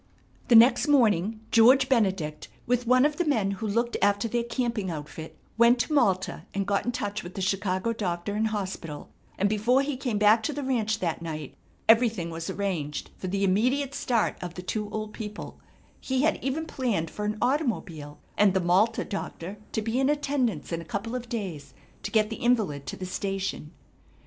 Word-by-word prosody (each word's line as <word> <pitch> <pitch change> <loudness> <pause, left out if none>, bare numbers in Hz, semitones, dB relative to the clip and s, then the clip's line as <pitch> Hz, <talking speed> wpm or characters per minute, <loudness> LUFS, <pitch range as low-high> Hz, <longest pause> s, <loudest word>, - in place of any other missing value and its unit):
The 240 - +5
next 240 +4 +7
morning 220 - +3
George 255 +4 +6
Benedict 190 - 0 0.2
with 245 0 0
one 255 +2 +5
of 300 0 0
the 350 - +2
men 225 - +1
who 215 +3 -4
looked 235 +3 0
after 205 +3 +2
their 240 +1 0
camping 235 -5 -2
outfit 155 0 -7 0.2
went 235 +1 +6
to 250 - -3
Malta 190 -10 +1
and 195 0 0
got 200 0 0
in - - +2
touch 205 -2 -3
with 175 +1 -9
the - - -4
Chicago 190 +3 0
doctor 185 -2 -3
and 220 +2 +1
hospital, 185 -8 -5 0.3
and 200 - +2
before 230 +6 +2
he 285 -1 -2
came 250 -4 -2
back 210 +2 +5
to 295 - -2
the 290 0 -4
ranch 225 -5 0
that 170 -2 -1
night 155 -4 -6 0.3
everything 225 -7 +3
was 165 0 -5
arranged 170 -8 -3
for 185 - -6
the 200 +2 -1
immediate 250 +9 +1
start 235 -5 0
of 175 -1 -6
the 180 - -7
two 210 +2 -3
old 215 0 -5
people 210 -2 -7 0.4
He 260 0 -1
had 315 - +1
even 280 +4 -1
planned 225 - -2
for 210 - -5
an 210 +1 -1
automobile 185 - -1 0.2
and 200 -2 +5
the - - +4
Malta 190 +6 +2
doctor 195 -1 -6
to 220 - -2
be 225 +3 -1
in 270 +1 +2
attendance 275 - -1
in 165 0 -2
a - - -8
couple 200 +7 -4
of 245 -1 -5
days 190 -11 -5 0.3
to - - -4
get 215 0 +2
the 225 - -4
invalid 210 - 0
to - - -5
the 185 - -5
station. 195 -4 -3
210 Hz, 195 wpm, -27 LUFS, 185-240 Hz, 0.4 s, next